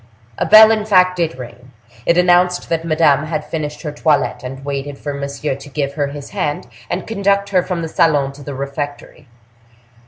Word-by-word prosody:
A -, -, 0 dB
bell, 215 Hz, +1 st, +9 dB
in 215 Hz, -1 st, +1 dB
fact, 185 Hz, -3 st, +3 dB
did 165 Hz, -4 st, -1 dB
ring; 125 Hz, 0 st, -11 dB, 0.3 s
it 170 Hz, -, +3 dB
announced 180 Hz, 0 st, +3 dB
that 165 Hz, -1 st, -1 dB
Madame 155 Hz, -3 st, +2 dB
had 155 Hz, -2 st, -3 dB
finished 150 Hz, -1 st, -5 dB
her 150 Hz, -, -4 dB
toilette, 150 Hz, 0 st, 0 dB
and 135 Hz, +2 st, -8 dB
waited 140 Hz, 0 st, -4 dB
for 145 Hz, 0 st, -5 dB
Monsieur 140 Hz, +1 st, -3 dB
to 140 Hz, +2 st, -10 dB
give 140 Hz, 0 st, -3 dB
her 145 Hz, -1 st, -1 dB
his 140 Hz, 0 st, -9 dB
hand, 150 Hz, -10 st, -2 dB, 0.2 s
and 180 Hz, +1 st, -3 dB
conduct 200 Hz, -2 st, 0 dB
her 185 Hz, -2 st, +3 dB
from 175 Hz, -2 st, -4 dB
the -, -, -3 dB
salon 145 Hz, -4 st, +2 dB
to 145 Hz, -, -14 dB
the 140 Hz, 0 st, -7 dB
refectory. 140 Hz, +1 st, -6 dB
150 Hz, 190 wpm, -18 LUFS, 140-180 Hz, 0.3 s, bell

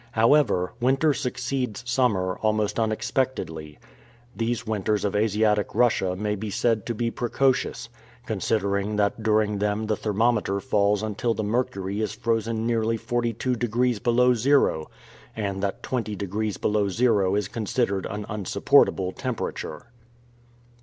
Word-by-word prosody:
However, 115 Hz, -6 st, +3 dB
winter 135 Hz, +4 st, +3 dB
succeeds 125 Hz, -4 st, -3 dB
summer 105 Hz, -8 st, +1 dB
almost 110 Hz, 0 st, 0 dB
unexpectedly. 110 Hz, -, -2 dB, 0.6 s
These 115 Hz, 0 st, -2 dB
winters 105 Hz, -1 st, -1 dB
of 100 Hz, -, -1 dB
Asiatic 105 Hz, 0 st, +1 dB
Russia 105 Hz, -7 st, +2 dB
may 105 Hz, +2 st, -1 dB
be 105 Hz, +1 st, -4 dB
said 110 Hz, 0 st, 0 dB
to 120 Hz, -, -2 dB
be 115 Hz, +1 st, -1 dB
precocious, 130 Hz, +2 st, 0 dB, 0.4 s
considering 100 Hz, -1 st, -1 dB
that 105 Hz, +2 st, 0 dB
during 105 Hz, -1 st, +1 dB
them 105 Hz, +1 st, 0 dB
the 110 Hz, 0 st, 0 dB
thermometer 105 Hz, -1 st, 0 dB
falls 100 Hz, +1 st, +1 dB
until 110 Hz, +2 st, -1 dB
the 110 Hz, -, -2 dB
mercury 105 Hz, -3 st, -1 dB
is 105 Hz, -1 st, -2 dB
frozen 115 Hz, -1 st, -1 dB
nearly 115 Hz, -1 st, +1 dB
42 120 Hz, +1 st, -1 dB
degrees 120 Hz, 0 st, 0 dB
below 125 Hz, +2 st, +3 dB
zero, 125 Hz, -, +2 dB, 0.5 s
and 100 Hz, -3 st, -3 dB
that 100 Hz, -1 st, -3 dB
20 110 Hz, -5 st, -2 dB
degrees 100 Hz, +2 st, -3 dB
below 105 Hz, -1 st, +1 dB
zero 100 Hz, -3 st, +2 dB
is 105 Hz, -2 st, 0 dB
considered 105 Hz, -2 st, -1 dB
an 105 Hz, 0 st, -5 dB
unsupportable 95 Hz, -2 st, +2 dB
temperature. 110 Hz, -, -5 dB
110 Hz, 130 wpm, -25 LUFS, 100-120 Hz, 0.6 s, However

